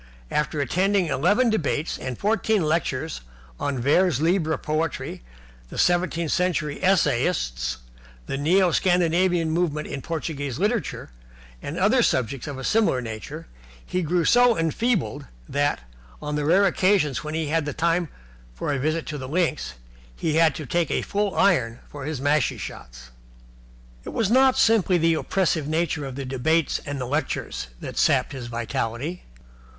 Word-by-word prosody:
After 150 Hz, 0 st, 0 dB
attending 190 Hz, +7 st, +1 dB
eleven 205 Hz, -, +2 dB
debates 160 Hz, -5 st, -1 dB
and 130 Hz, -2 st, -5 dB
fourteen 220 Hz, -2 st, +1 dB
lectures 160 Hz, -1 st, -1 dB, 0.4 s
on 140 Hz, -2 st, -1 dB
vers 145 Hz, +4 st, +3 dB
libre 160 Hz, 0 st, +1 dB
Poetry, 155 Hz, +2 st, -3 dB, 0.5 s
the -, -, -9 dB
Seventeenth 175 Hz, -2 st, +1 dB
Century 170 Hz, -5 st, 0 dB
Essayists, 60 Hz, -, +1 dB, 0.5 s
the -, -, -3 dB
Neo 175 Hz, +6 st, +3 dB
Scandinavian 175 Hz, -1 st, +2 dB
Movement 160 Hz, -3 st, 0 dB
in 135 Hz, -, -5 dB
Portuguese 145 Hz, -5 st, -4 dB
Literature, 205 Hz, -, -2 dB, 0.5 s
and -, -, -5 dB
other -, -, +4 dB
subjects 130 Hz, +3 st, 0 dB
of 145 Hz, -2 st, -5 dB
a 130 Hz, -, -7 dB
similar 210 Hz, -, +2 dB
nature, 110 Hz, -3 st, -7 dB, 0.4 s
he 185 Hz, -, -1 dB
grew 170 Hz, 0 st, +1 dB
so 245 Hz, +2 st, +5 dB
enfeebled 165 Hz, -, -1 dB, 0.2 s
that, 145 Hz, -, 0 dB, 0.4 s
on 150 Hz, -, -4 dB
the 150 Hz, -1 st, -1 dB
rare 190 Hz, +6 st, +4 dB
occasions 185 Hz, -7 st, +2 dB
when 155 Hz, +1 st, -4 dB
he 160 Hz, -2 st, -2 dB
had 150 Hz, -3 st, -1 dB
time 170 Hz, 0 st, +1 dB, 0.5 s
for 105 Hz, -, -2 dB
a 140 Hz, -, -1 dB
visit 155 Hz, +4 st, -1 dB
to 150 Hz, -3 st, -5 dB
the 130 Hz, -1 st, -6 dB
links, 160 Hz, -, -1 dB, 0.4 s
he 155 Hz, -, -1 dB
had 165 Hz, -1 st, +4 dB
to 155 Hz, -, -6 dB
take 170 Hz, +4 st, 0 dB
a -, -, 0 dB
full 205 Hz, -1 st, -1 dB
iron 125 Hz, -12 st, +2 dB
for 145 Hz, -2 st, -8 dB
his 150 Hz, -3 st, -3 dB
mashie 145 Hz, 0 st, +1 dB
shots. -, -, -9 dB, 0.9 s
It -, -, -7 dB
was 220 Hz, -2 st, 0 dB
not 260 Hz, +1 st, +5 dB
simply 210 Hz, -5 st, +4 dB
the 165 Hz, 0 st, +3 dB
oppressive 160 Hz, -2 st, 0 dB
nature 160 Hz, -2 st, -1 dB
of 135 Hz, -2 st, -6 dB
the 140 Hz, 0 st, -5 dB
debates 140 Hz, +5 st, 0 dB
and 145 Hz, 0 st, -3 dB
lectures 130 Hz, -, -2 dB
that -, -, -5 dB
sapped -, -, +3 dB
his 130 Hz, -4 st, -6 dB
vitality. 120 Hz, +6 st, -3 dB
160 Hz, 150 wpm, -24 LUFS, 140-180 Hz, 0.9 s, so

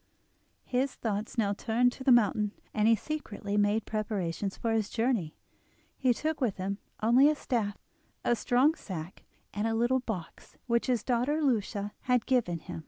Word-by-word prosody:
His 255 Hz, +1 st, 0 dB
thoughts 215 Hz, 0 st, -3 dB
now 205 Hz, -3 st, +2 dB
turned 235 Hz, +4 st, +2 dB
to 260 Hz, -, -9 dB
the 265 Hz, -, +4 dB
mountain, 210 Hz, -3 st, +3 dB, 0.2 s
and 215 Hz, 0 st, +2 dB
he 230 Hz, -, +6 dB
secretly 210 Hz, -6 st, -4 dB
made 205 Hz, +1 st, +2 dB
preparations 200 Hz, -3 st, -2 dB
for 230 Hz, -, -1 dB
his 220 Hz, -2 st, 0 dB
journey. 225 Hz, -9 st, 0 dB, 0.6 s
He 255 Hz, -2 st, +2 dB
took 305 Hz, +5 st, -2 dB
with 230 Hz, -7 st, 0 dB
him 195 Hz, +2 st, -3 dB, 0.2 s
only 250 Hz, +6 st, +6 dB
a 305 Hz, -, +1 dB
staff, 225 Hz, -8 st, -2 dB, 0.5 s
a 240 Hz, -, +3 dB
strong 255 Hz, +6 st, +3 dB
sack, 180 Hz, -, -8 dB, 0.3 s
and 210 Hz, +2 st, -1 dB
a 225 Hz, -, 0 dB
little 240 Hz, +3 st, +2 dB
box 215 Hz, -9 st, -7 dB
which 235 Hz, +1 st, +1 dB
his 245 Hz, -4 st, +1 dB
daughter 255 Hz, +5 st, +1 dB
Lucia 210 Hz, -5 st, 0 dB
had 250 Hz, -2 st, +2 dB
given 240 Hz, -10 st, +1 dB
him. -, -, -7 dB
225 Hz, 170 wpm, -30 LUFS, 205-250 Hz, 0.6 s, he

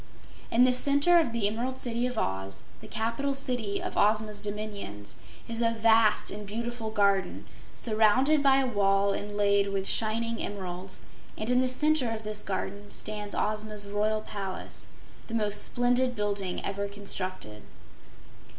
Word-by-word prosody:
In 235 Hz, +2 st, +4 dB
the 255 Hz, 0 st, +5 dB
center 285 Hz, +7 st, +6 dB
of 310 Hz, -8 st, 0 dB
the 230 Hz, -3 st, +2 dB
Emerald 245 Hz, +5 st, -3 dB
City 240 Hz, 0 st, 0 dB
of 250 Hz, -2 st, -6 dB
Oz, 95 Hz, -, -1 dB, 0.2 s
the -, -, -11 dB
capital 235 Hz, +5 st, -2 dB
city 245 Hz, -7 st, -1 dB
of -, -, -5 dB
Ozma's 210 Hz, 0 st, +1 dB
dominions, 205 Hz, -, -6 dB, 0.3 s
is 230 Hz, 0 st, -3 dB
a 230 Hz, -, +3 dB
vast 225 Hz, -1 st, +3 dB
and 210 Hz, +1 st, -6 dB
beautiful 230 Hz, +1 st, -4 dB
garden, 200 Hz, -3 st, +1 dB, 0.3 s
surrounded 240 Hz, +7 st, +3 dB
by 270 Hz, -1 st, +5 dB
a 270 Hz, -, +2 dB
wall 200 Hz, -3 st, +2 dB
inlaid 205 Hz, -1 st, +1 dB
with 195 Hz, -1 st, -1 dB
shining 230 Hz, +1 st, +1 dB
emeralds, 185 Hz, -1 st, -5 dB, 0.4 s
and 220 Hz, +3 st, -2 dB
in 250 Hz, +1 st, +4 dB
the 255 Hz, -, +2 dB
center 295 Hz, 0 st, +2 dB
of 225 Hz, -1 st, -5 dB
this 210 Hz, 0 st, -3 dB
garden 200 Hz, +1 st, -5 dB
stands 210 Hz, -1 st, -5 dB
Ozma's 215 Hz, -1 st, -1 dB
Royal 210 Hz, +1 st, 0 dB
Palace, 195 Hz, -3 st, -6 dB, 0.4 s
the 230 Hz, -, -4 dB
most 210 Hz, -2 st, +2 dB
splendid 245 Hz, +1 st, +1 dB
building 200 Hz, -3 st, -2 dB
ever 200 Hz, +1 st, -3 dB
constructed. 185 Hz, -, -5 dB
215 Hz, 150 wpm, -28 LUFS, 200-240 Hz, 0.4 s, center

